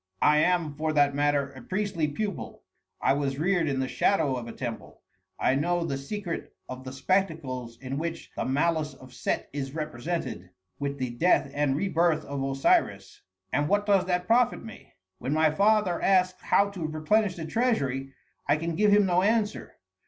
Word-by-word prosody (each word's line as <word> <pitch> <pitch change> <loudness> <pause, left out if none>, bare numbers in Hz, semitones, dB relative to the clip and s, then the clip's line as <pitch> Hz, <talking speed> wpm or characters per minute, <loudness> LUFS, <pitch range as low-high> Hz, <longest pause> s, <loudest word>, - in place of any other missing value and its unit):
I 150 - +5
am, 170 -1 +2
for 155 +2 -2
that 145 -2 +3
matter, 145 -1 +1
a - - -12
priestly 190 -5 -1
pupil. 200 +6 -5 0.4
I - - +3
was 135 -1 -1
reared 175 +1 +1
in 135 -1 -1
the 130 - 0
shadow 145 -7 +1
of 120 -2 -5
a - - -6
temple, 120 -2 -7 0.4
I - - +3
know 170 +5 0
the 140 - -2
secret 170 +6 -5
of 130 0 -7
the 130 - -6
spectacles 135 -7 -1
in 135 +1 -4
which 165 +1 -5
the - - -2
malice 155 +3 0
of 130 -1 -15
Set - - -2
is 140 0 -4
represented, 155 - -4 0.3
with 140 0 -3
the 130 -2 -3
death 165 +10 +2
and 145 -2 +1
re 195 +7 0
birth 170 -3 +1
of 140 -1 -4
Osiris, 135 0 +1 0.3
and 145 +2 +1
what 205 +1 +2
does 200 -3 +3
that 180 -1 0
profit 235 +4 +2
me? 220 - -12 0.3
When 135 - -2
my 155 0 +3
father 200 0 +2
asks 185 -1 +2
how 200 0 +2
to 175 -6 -4
replenish 180 +6 +1
the 165 -3 -6
treasury, 140 - 0 0.4
I 145 +1 +3
can 165 +1 -3
give 210 +4 +3
him 205 0 +5
no 180 -1 +3
answer. 215 +1 0
155 Hz, 180 wpm, -27 LUFS, 140-185 Hz, 0.4 s, I